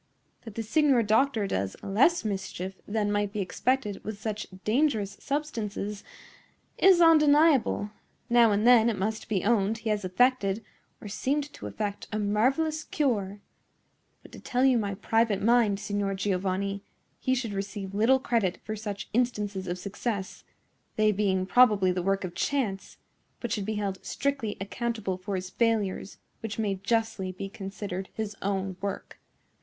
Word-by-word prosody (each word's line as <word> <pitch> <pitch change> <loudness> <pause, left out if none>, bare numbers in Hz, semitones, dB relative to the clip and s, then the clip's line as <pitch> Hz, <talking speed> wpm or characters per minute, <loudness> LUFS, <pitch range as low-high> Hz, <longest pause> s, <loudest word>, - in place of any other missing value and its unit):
That 225 -2 -9
the 225 - -2
signor 265 +1 +3
doctor 220 +1 +2
does 95 - -2
less 240 - +3
mischief 195 -2 -3
than 205 -1 0
might 205 -1 0
be 210 - -4
expected 210 +2 -1
with 215 -1 -6
such 215 -1 -4 0.2
dangerous 220 -4 +1
substances 220 -8 -3 0.8
is 375 -2 +6
undeniable. 300 -9 +5 0.4
Now 235 -2 +5
and 205 +2 +1
then, 235 -2 +7
it 220 - -2
must 215 +3 -3
be 195 -5 0
owned, 215 -1 +2
he 225 0 -4
has 210 -1 -1
effected, 210 +1 +1 0.3
or - - -9
seemed 285 +7 -2
to - - -7
effect, 205 -2 -4
a 215 - -1
marvellous 260 +10 +1
cure; 205 -8 -1 0.8
but, - - -15
to - - -10
tell 250 +1 0
you 255 -3 +4
my 200 -2 -2
private 225 0 +1
mind, 225 -3 +3
Signor 205 -1 -2
Giovanni, 195 0 -1 0.4
he 260 - +1
should 235 -5 -3
receive 195 0 -5
little 225 +6 +4
credit 230 -8 0
for 215 - -4
such 205 -2 -5
instances 210 -5 -1
of 175 +1 -2
success,—they 205 +1 -3
being 190 -2 +1
probably 210 -4 +5
the 180 0 -1
work 195 +2 0
of 180 -2 -5
chance,—but 235 -1 -4
should 205 -3 -1
be 220 - -1
held 200 -2 -3
strictly 275 -7 -2
accountable 210 -1 -3
for 195 +2 -4
his 185 0 -4
failures, 215 -4 0 0.2
which 220 -1 -5
may 210 -3 0
justly 200 -1 -1
be 185 +2 -6
considered 195 -1 -6
his 215 -2 -4
own 195 -1 -2
work." 200 -1 -5
210 Hz, 150 wpm, -28 LUFS, 195-235 Hz, 0.8 s, then